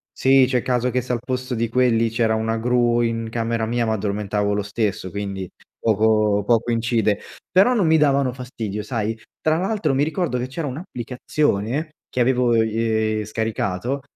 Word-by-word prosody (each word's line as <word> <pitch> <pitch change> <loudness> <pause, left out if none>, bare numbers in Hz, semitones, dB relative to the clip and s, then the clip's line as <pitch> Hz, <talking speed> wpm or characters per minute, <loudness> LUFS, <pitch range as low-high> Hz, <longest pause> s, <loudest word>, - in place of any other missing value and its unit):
Sì, 135 0 +5
c’è 130 -1 +1
il 120 - -1
caso 125 0 0
che 125 +1 0
se 125 +1 -5
al 120 - +1
posto 130 -1 -2
di 115 0 -1
quelli 115 -2 +2
c’era 115 0 +1
una 110 +1 -1
gru 120 0 +2
in 115 -1 -1
camera 115 -1 -1
mia 120 +1 0
mi 110 - +1
addormentavo 105 0 -1
lo 105 - 0
stesso, 100 -2 -2
quindi 100 -1 -5 0.3
poco 105 -1 +2
poco 120 +1 +2
incide, 115 -3 +1 0.3
però 200 +7 +5
non 200 -8 +2
mi 160 - +5
davano 140 -3 +3
fastidio 115 -5 -5
sai, 110 -1 -3 0.2
tra 155 0 +2
l’altro 185 -6 0
mi 140 - +2
ricordo 160 -3 -1
che 125 - -2
c’era 145 +3 -4
un’applicazione 130 - -2 0.2
che - - -3
avevo 125 -1 +3
i 110 -1 +1
ehm, - - -4
scaricato, 110 +3 -2
115 Hz, 180 wpm, -22 LUFS, 110-130 Hz, 0.3 s, Sì